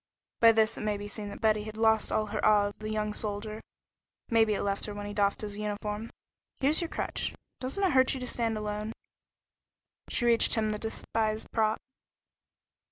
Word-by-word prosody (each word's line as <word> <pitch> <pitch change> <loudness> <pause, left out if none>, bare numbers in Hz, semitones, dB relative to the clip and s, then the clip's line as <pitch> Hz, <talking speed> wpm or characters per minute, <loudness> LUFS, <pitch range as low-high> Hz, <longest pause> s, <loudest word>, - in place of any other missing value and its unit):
By 230 0 +8
this 220 0 +2
it - - -5
may 210 -1 0
be 205 0 -6
seen 205 0 -5
that - - -9
Betty 215 -1 +3
had 215 0 -7
lost 220 -1 +3
all 215 - +1
her 210 0 -4
awe 210 -1 +5
of 205 0 -5
the 215 0 -5
young 215 -1 -1
soldier. 215 +1 -3 0.7
Maybe 225 -2 +4
it - - -2
left 200 0 -1
her 210 - -6
when 205 0 -5
he 205 - -5
doffed 200 -1 +1
his 205 -1 -5
uniform. 210 +1 -3 0.5
"Here's 290 +6 +3
your 340 - -1
crutch. - - -3 0.2
Doesn't 265 +10 -2
it 380 - +4
hurt 260 -1 +4
you - - -4
to 250 - -4
stand 230 -2 -1
alone?" 210 +1 -3 1.2
She 240 - 0
reached 235 -1 +5
him 215 -1 +1
the 210 - -3
despised 220 0 -1
prop. 220 -1 +2
215 Hz, 195 wpm, -29 LUFS, 210-225 Hz, 1.2 s, By